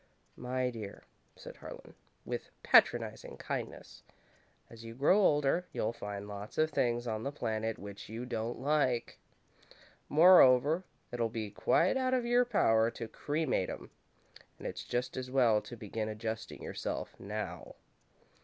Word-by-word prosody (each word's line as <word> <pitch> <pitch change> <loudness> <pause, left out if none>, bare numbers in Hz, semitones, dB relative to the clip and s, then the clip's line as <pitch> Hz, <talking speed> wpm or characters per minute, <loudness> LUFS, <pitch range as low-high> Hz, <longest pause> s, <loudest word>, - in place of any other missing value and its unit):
"My 125 0 -2
dear," 110 -4 -8 0.3
said - - -11
Harlan, - - -10 0.3
with - - -4
patronising - - +3
kindness, - - -6 0.7
"as 115 0 -13
you 115 0 -9
grow 145 - +4
older, 150 0 +3
you'll 110 - -1
find 105 -2 -6
lots 105 +1 -8
of 155 0 +2
things 120 -3 0
on 110 -2 -2
the 140 - -3
planet 110 -5 -2
which 100 0 -9
you 115 +3 -5
don't 115 -1 -3
like. 130 -4 0 0.9
Moreover, 155 -1 +6 0.3
it'll 120 -2 -1
be 110 -2 -4
quite 175 - +2
out 260 0 +1
of 245 -2 0
your 245 +1 +4
power 115 - +3
to 115 -1 -6
cremate 145 - -1
'em, - - -8 0.7
and - - -12
it's - - -5
just 125 +1 -2
as 130 0 -4
well 120 -5 +4
to 115 +3 -10
begin 110 0 -4
adjusting 110 +1 -5
yourself - - -5
now." 105 +2 -6
120 Hz, 145 wpm, -32 LUFS, 110-145 Hz, 0.9 s, Moreover